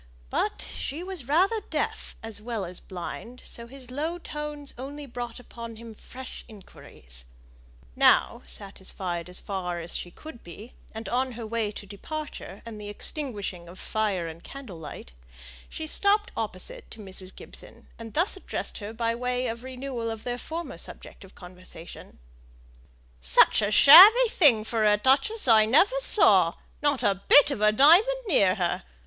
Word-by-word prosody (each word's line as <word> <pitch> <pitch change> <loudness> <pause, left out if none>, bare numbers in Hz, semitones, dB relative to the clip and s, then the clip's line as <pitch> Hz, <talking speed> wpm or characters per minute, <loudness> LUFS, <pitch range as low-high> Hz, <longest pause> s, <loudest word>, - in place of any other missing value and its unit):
But - - -1
she 310 +6 -5
was 365 -9 -7
rather 375 +10 +3
deaf - - -3
as 225 -2 -8
well 225 -3 -4
as 175 +1 -5
blind, 195 +7 -8
so 235 0 -5
his 255 0 -11
low 315 +6 -3
tones 300 -3 -6
only 285 +4 -7
brought 240 -2 -7
upon 235 -2 -9
him 230 0 -11
fresh 255 +4 -10
inquiries. - - -12 0.7
Now, - - +4
satisfied 185 -3 -4
as 180 - -1
far 180 -3 -4
as 170 0 -5
she 175 - -4
could 310 - -12
be, 200 +8 -12 0.2
and 220 +1 -6
on 255 +1 -1
her 230 0 -7
way 220 -1 -2
to 205 - -8
departure, 300 +10 -8
and 220 -2 -8
the 205 - -7
extinguishing 205 - -2
of 180 - -12
fire 205 -6 -2
and 165 +1 -10
candle 255 -12 -10
light, 150 - -9 0.6
she 315 - -6
stopped 410 +6 +3
opposite - - -5
to - - -12
Mrs. 190 -2 -7
Gibson, - - -12
and 225 -1 -9
thus 345 +7 +1
addressed 380 - -6
her 210 +1 -7
by 230 0 -1
way 250 +1 -2
of 230 0 -4
renewal 255 -2 -5
of 225 -1 -6
their 245 0 -4
former 335 +5 -6
subject - - -9
of 190 - -16
conversation: 180 -2 -12 1.0
"Such 65 - +5
a 205 - +1
shabby 390 - +9
thing 265 - +5
for 220 0 -1
a 210 -1 +4
duchess 275 - +2
I 220 -2 +6
never 380 - +4
saw; 190 - +4 0.3
not 290 -4 +1
a 195 -3 +1
bit 290 0 +7
of 245 - -4
a 215 0 +5
diamond 360 - +5
near 195 - +3
her! 175 -2 -1
230 Hz, 165 wpm, -26 LUFS, 200-290 Hz, 1.0 s, shabby